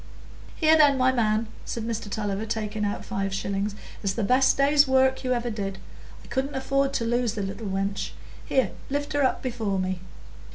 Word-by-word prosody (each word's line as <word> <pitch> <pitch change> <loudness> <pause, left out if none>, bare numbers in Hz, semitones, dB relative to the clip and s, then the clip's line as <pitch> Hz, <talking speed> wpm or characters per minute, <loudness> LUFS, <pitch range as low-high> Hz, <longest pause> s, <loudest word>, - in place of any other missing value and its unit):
"Here, 315 -1 +5
then, 290 -3 +6
my 260 0 +4
man," 220 -3 +1 0.2
said 230 - -4
Mr 225 -2 -3
Tulliver, 205 0 -2
taking 215 -1 -2
out 205 0 -2
five 195 0 -2
shillings. 200 +1 -2 0.3
"It's 195 -2 0
the 225 - -2
best 255 +5 +4
day's 285 +1 +5
work 265 0 +3
you 255 - -1
ever 240 -1 0
did. 195 -3 -4 0.5
I - - -15
couldn't 270 +1 -2
afford 275 +1 +1
to 235 -4 0
lose 240 -1 +1
the 205 - -2
little 200 +3 -5
wench; 195 0 -2 0.3
here, 265 - +1 0.2
lift 285 +2 -2
her 290 -1 +2
up 260 - +1
before 225 -6 -1
me." 185 -1 -1
230 Hz, 190 wpm, -26 LUFS, 200-265 Hz, 0.5 s, then